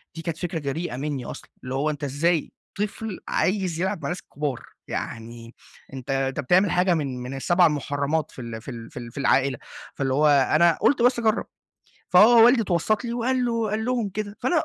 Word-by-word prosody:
دي 165 Hz, -, -6 dB
كانت 165 Hz, -1 st, -4 dB
فكرة 175 Hz, -2 st, -3 dB
جريئة 145 Hz, 0 st, -4 dB
منّي 140 Hz, -2 st, -3 dB
أصلًا، -, -, -9 dB
اللي 130 Hz, 0 st, -5 dB
هو 145 Hz, +3 st, 0 dB
أنتَ 145 Hz, -1 st, -5 dB
إزاي 155 Hz, +4 st, 0 dB, 0.3 s
طفل 210 Hz, 0 st, -4 dB
عايز 185 Hz, -4 st, 0 dB
يلعب 190 Hz, -, 0 dB
مع -, -, -6 dB
الناس 175 Hz, -, -3 dB
الكبار؟ 145 Hz, -4 st, -4 dB, 0.3 s
يعني 115 Hz, +1 st, -6 dB, 0.4 s
أنتَ 130 Hz, 0 st, -8 dB
أنتَ 135 Hz, 0 st, -1 dB
بتعمل 180 Hz, +7 st, +3 dB
حاجة 180 Hz, 0 st, +3 dB
من 140 Hz, -6 st, -2 dB
من 125 Hz, +2 st, -6 dB
ال7 175 Hz, +6 st, +3 dB
مُحرمات 145 Hz, +1 st, -1 dB
في -, -, -10 dB
ال 115 Hz, -2 st, -7 dB
في 135 Hz, -, -8 dB
ال 115 Hz, -1 st, -9 dB
في -, -, -12 dB
ال 120 Hz, -1 st, -8 dB
في -, -, -16 dB
العائلة، 135 Hz, -1 st, +2 dB, 0.4 s
فاللي 135 Hz, -1 st, -1 dB
هو 150 Hz, +3 st, +3 dB
أنا 145 Hz, +4 st, +4 dB
قلت 260 Hz, -4 st, +3 dB
بس 245 Hz, 0 st, +4 dB
أجرب. 220 Hz, -1 st, +1 dB, 0.7 s
فهو 225 Hz, +5 st, +7 dB
والدي 240 Hz, -1 st, +5 dB
اتوسط 200 Hz, +5 st, 0 dB
لي 235 Hz, -, -3 dB
وقال 250 Hz, +2 st, 0 dB
له 230 Hz, -3 st, -1 dB
قال 220 Hz, +1 st, -1 dB
لهم 240 Hz, -4 st, 0 dB
كده، 205 Hz, +1 st, -5 dB
فأنا 310 Hz, +6 st, +1 dB
165 Hz, 200 wpm, -24 LUFS, 135-210 Hz, 0.7 s, فهو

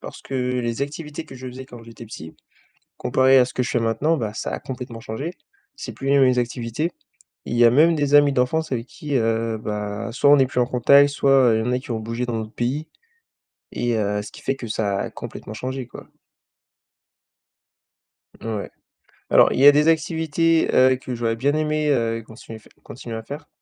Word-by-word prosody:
parce -, -, -10 dB
que 135 Hz, -, -8 dB
les 125 Hz, -1 st, -1 dB
activités 150 Hz, +2 st, -6 dB
que 135 Hz, -, -13 dB
je 130 Hz, 0 st, -9 dB
faisais 130 Hz, +1 st, -8 dB
quand 120 Hz, -3 st, -13 dB
j'étais 115 Hz, 0 st, -12 dB
petit, 80 Hz, -7 st, -10 dB, 0.6 s
comparé 130 Hz, 0 st, +3 dB
à 125 Hz, -, +5 dB
ce 125 Hz, -, -9 dB
que 125 Hz, -, 0 dB
je 125 Hz, -, -3 dB
fais 120 Hz, -, 0 dB
maintenant, 115 Hz, +9 st, +1 dB
bah, 110 Hz, -6 st, -3 dB
ça -, -, -4 dB
a -, -, -3 dB
complètement 125 Hz, -3 st, -7 dB
changé. 135 Hz, +10 st, -5 dB, 0.4 s
C'est -, -, -7 dB
plus 135 Hz, -, -6 dB
les 140 Hz, 0 st, +4 dB
mêmes 130 Hz, -2 st, +4 dB
activités. 120 Hz, +6 st, -2 dB, 0.5 s
Il 120 Hz, -, -4 dB
y 120 Hz, -, +5 dB
a 115 Hz, -, +7 dB
même 160 Hz, +6 st, +5 dB
des 145 Hz, -1 st, 0 dB
amis 145 Hz, -1 st, +6 dB
d'enfance 135 Hz, +4 st, 0 dB
avec 115 Hz, 0 st, -2 dB
qui, 145 Hz, -3 st, -4 dB
heu, 115 Hz, -1 st, 0 dB
bah, 105 Hz, +1 st, -4 dB
soit 140 Hz, +3 st, +3 dB
on 145 Hz, -, +8 dB
n'est 135 Hz, -1 st, +4 dB
plus 125 Hz, -1 st, -1 dB
en 120 Hz, -, +2 dB
contact, 140 Hz, +3 st, +5 dB
soit, 140 Hz, -1 st, 0 dB, 0.2 s
heu, -, -, +2 dB
il -, -, +1 dB
y -, -, -1 dB
en -, -, 0 dB
a 125 Hz, -, +1 dB
qui 130 Hz, -, -12 dB
ont 110 Hz, -, -2 dB
bougé 115 Hz, +3 st, -4 dB
dans 120 Hz, -1 st, -4 dB
un -, -, -2 dB
autre 110 Hz, 0 st, -8 dB
pays. 140 Hz, +6 st, -2 dB, 0.8 s
Et 120 Hz, -1 st, -1 dB
heu, 105 Hz, -1 st, -1 dB
ce -, -, -11 dB
qui -, -, -13 dB
fait 135 Hz, -, -1 dB
que 120 Hz, -, -7 dB
ça 100 Hz, -2 st, -1 dB
a -, -, -3 dB
complètement 110 Hz, -, -9 dB
changé, 130 Hz, +2 st, -5 dB
quoi. -, -, -12 dB, 2.3 s
Ouais, 110 Hz, -3 st, -4 dB, 0.6 s
alors, -, -, +5 dB
il -, -, -2 dB
y 140 Hz, -, +7 dB
a -, -, +11 dB
des 150 Hz, +2 st, +2 dB
activités, 160 Hz, 0 st, +1 dB
heu, 130 Hz, 0 st, +5 dB
que 125 Hz, -1 st, -6 dB
j'aurais 115 Hz, -1 st, -1 dB
bien 140 Hz, +5 st, 0 dB
aimé, 155 Hz, -1 st, 0 dB
heu, 115 Hz, -3 st, 0 dB
continuer 110 Hz, 0 st, -11 dB
f -, -, -21 dB, 0.2 s
continuer 120 Hz, -2 st, -8 dB
à 110 Hz, -, -6 dB
faire 145 Hz, +5 st, -9 dB
125 Hz, 220 wpm, -22 LUFS, 115-140 Hz, 2.3 s, a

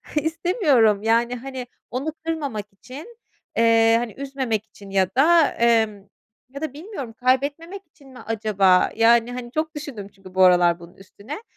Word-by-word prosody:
istemiyorum 300 Hz, -, +2 dB
yani, 235 Hz, +2 st, +1 dB
hani, 260 Hz, 0 st, -7 dB, 0.2 s
onu 280 Hz, +5 st, -3 dB
kırmamak 285 Hz, -11 st, -3 dB
için, 290 Hz, -, -12 dB, 0.4 s
eee, 225 Hz, 0 st, +4 dB
hani, 235 Hz, -3 st, -5 dB
üzmemek 265 Hz, -6 st, -3 dB
için 200 Hz, -2 st, -15 dB
ya 190 Hz, -1 st, +1 dB
da, 325 Hz, +3 st, +5 dB
emm 220 Hz, -4 st, +1 dB, 0.4 s
ya 280 Hz, +2 st, -9 dB
da 310 Hz, -4 st, -4 dB
bilmiyorum 295 Hz, -, -8 dB
kaybetmemek 285 Hz, -, -1 dB
için 280 Hz, -3 st, -20 dB
mi 255 Hz, -1 st, -13 dB
acaba? 205 Hz, -4 st, +2 dB
Yani, 230 Hz, +1 st, +4 dB
hani, 245 Hz, -1 st, -7 dB
çok 310 Hz, +2 st, -3 dB
düşündüm 275 Hz, -9 st, -7 dB
çünkü 195 Hz, -2 st, -17 dB
bu 190 Hz, -, +5 dB
aralar 175 Hz, -1 st, +4 dB
bunun 170 Hz, +1 st, -14 dB
üstüne. 200 Hz, -, -10 dB
240 Hz, 150 wpm, -22 LUFS, 215-290 Hz, 0.4 s, da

